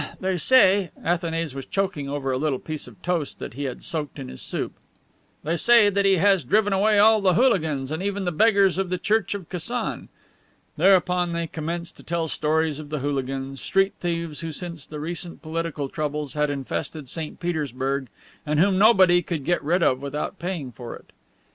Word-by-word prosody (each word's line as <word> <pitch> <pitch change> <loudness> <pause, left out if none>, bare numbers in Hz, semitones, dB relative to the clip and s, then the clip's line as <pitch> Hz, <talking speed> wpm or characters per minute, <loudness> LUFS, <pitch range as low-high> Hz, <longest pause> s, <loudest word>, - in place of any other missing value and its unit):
ah, - - -7
ah... - - -17
they 190 0 0
say..." 195 -2 +4 0.2
(Athanase 165 -3 -1
was 135 -1 -7
choking 190 -8 -2
over 140 -2 -2
a 130 - 0
little 145 -2 0
piece 155 +1 -6
of 115 -4 -14
toast 170 -4 -1
that - - -7
he 140 +3 -4
had 130 - -5
soaked 150 -5 -4
in 65 - -7
his 65 - -7
soup) - - -3 0.7
"they 165 +3 0
say 230 +2 +6
that 200 0 +1
he 195 -1 +5
has 195 -1 +3
driven 205 - +2
away 210 +2 +3
all 215 +1 +6
the 185 -3 +3
hooligans 160 - +2
and 160 +2 -3
even 200 0 -2
all - - -4
the 175 - 0
beggars 195 +1 +4
of 190 -2 -1
the 180 - 0
church 210 +1 0
of 190 -5 -7
Kasan." 190 +8 -3 0.7
Thereupon 180 -2 +3
they 170 0 -1
commenced 165 +2 -5
to - - -14
tell 165 -1 -2
stories 155 0 0
of 150 -1 -9
the 150 -2 -3
hooligans, 135 -1 -3
street 195 0 +2
thieves 170 -3 -3
who 165 -1 -4
since 170 -2 -6
the 150 - -7
recent 170 +3 -4
political 160 -3 -3
troubles 150 -2 -3
had 150 -1 +1
infested 145 +1 -4
St. 155 +3 -5
Petersburg 140 -5 -2 0.4
and 150 0 0
whom 190 +2 +3
nobody, 185 -5 +6
could 160 -6 -4
get 175 -3 +1
rid 170 +4 +2
of 130 -3 +2
without 140 +1 -4
paying 170 -7 -4
for 120 +1 -8
it. - - -17
165 Hz, 200 wpm, -24 LUFS, 145-190 Hz, 0.7 s, say